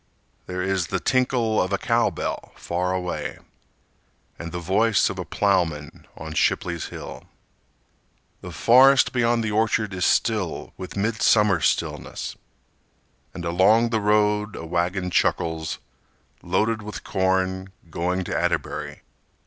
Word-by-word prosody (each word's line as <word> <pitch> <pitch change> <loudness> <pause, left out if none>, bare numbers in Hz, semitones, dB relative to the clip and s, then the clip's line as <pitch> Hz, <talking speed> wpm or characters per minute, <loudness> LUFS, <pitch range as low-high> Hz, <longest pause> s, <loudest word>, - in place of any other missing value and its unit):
There 90 0 -3
is 95 -3 0
the - - -2
tinkle 125 -4 +1
of 95 - -2
a 100 - +1
cowbell 115 +3 -1
far 90 +1 -2
away, 90 -1 -3 1.0
And 85 0 -6
the 90 - -4
voice 100 +5 +2
of - - -7
a - - -4
plowman 85 -7 -1
on 80 0 -7
Shipley's 85 +1 0
hill. - - -9 1.2
The 90 - -8
forest 130 - +5
beyond 120 -2 +2
the 110 - -2
orchard 110 -1 +1
is 90 -1 -3
still 105 -6 0
With 95 +2 -8
midsummer 105 -3 +3
stillness; - - -2 1.0
And 85 - -6
along 100 +7 +4
the 110 -2 +1
road 105 0 +2
a 80 - -7
wagon 90 +2 -1
chuckles, 80 -2 0 0.6
Loaded 110 +5 0
with 105 0 -8
corn, 95 0 0 0.2
going 90 +3 -1
to - - -4
Atterbury. - - -2
95 Hz, 125 wpm, -24 LUFS, 90-110 Hz, 1.2 s, forest